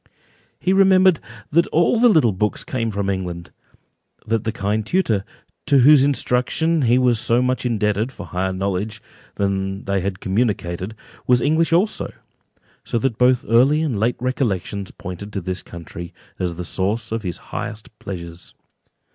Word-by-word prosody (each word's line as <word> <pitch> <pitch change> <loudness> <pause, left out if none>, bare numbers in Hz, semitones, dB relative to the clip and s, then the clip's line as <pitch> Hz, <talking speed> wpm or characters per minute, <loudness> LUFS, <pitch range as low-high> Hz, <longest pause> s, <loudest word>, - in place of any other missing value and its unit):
He 185 - +1
remembered 190 -3 +5 0.3
that 170 +3 +3
all 170 +8 +2
the 245 +1 +6
little 155 - +4
books 105 +2 -1
came 115 -3 -2
from 100 -2 -2
England—that 95 +4 -6
the 110 - 0
kind 105 0 -1
tutor, 110 - +1 0.4
to 140 - +5
whose 135 +2 +7
instruction 145 +4 +1
he 120 -1 +4
was 125 -3 +3
so 120 0 +2
much 125 0 0
indebted 105 +1 0
for - - -9
higher 95 +1 -2
knowledge 100 +3 -2 0.4
than 95 0 -1
they 100 -1 0
had 95 0 -3
communicated, 95 -2 -1 0.3
was 125 -1 +5
English 160 +5 +2
also; 185 +6 +1 0.7
so - - -2
that 120 -1 -1
both 125 0 +3
early 135 +7 +4
and 130 -10 -1
late 115 +3 +1
recollections 105 -6 -2
pointed 90 +3 -8
to 100 - -1
this 90 +1 -4
country, 85 0 -9 0.2
as 90 -2 -2
the 90 +1 -5
source 105 +6 -2
of 115 0 -1
his 90 -4 -4 0.2
highest 115 -3 -6
pleasures. 85 -3 -8
110 Hz, 155 wpm, -21 LUFS, 95-130 Hz, 0.7 s, whose